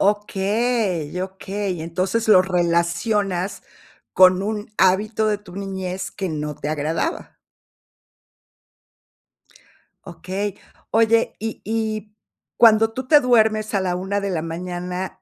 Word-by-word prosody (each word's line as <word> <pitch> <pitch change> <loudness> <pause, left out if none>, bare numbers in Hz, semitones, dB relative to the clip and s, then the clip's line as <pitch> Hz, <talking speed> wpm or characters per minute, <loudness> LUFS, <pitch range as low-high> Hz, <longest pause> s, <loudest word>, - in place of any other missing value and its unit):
Okey, 205 -3 0
okey. 190 -1 -4
Entonces, 185 +7 -1
lo 185 -4 +7
relacionas 180 +2 0 0.5
con 185 +1 +6
un 210 0 -4
hábito 210 +4 +2
de 210 -1 0
tu 190 -3 -14
niñez 190 -2 -4
que 190 -3 -4
no 150 -1 -3
te 145 - -5
agradaba. 155 - -3 2.7
Okey. 185 +4 -4 0.4
Oye, 230 +1 +3
y 225 0 -5
y 215 -1 -3 0.4
cuando 225 -1 +5
tú 260 0 -5
te 300 +1 +7
duermes 220 -4 +2
a 195 - +2
la 180 -1 -1
1 190 +3 -2
de 200 - -2
la 165 -4 -1
mañana. 180 +2 -5
195 Hz, 115 wpm, -22 LUFS, 180-215 Hz, 2.7 s, lo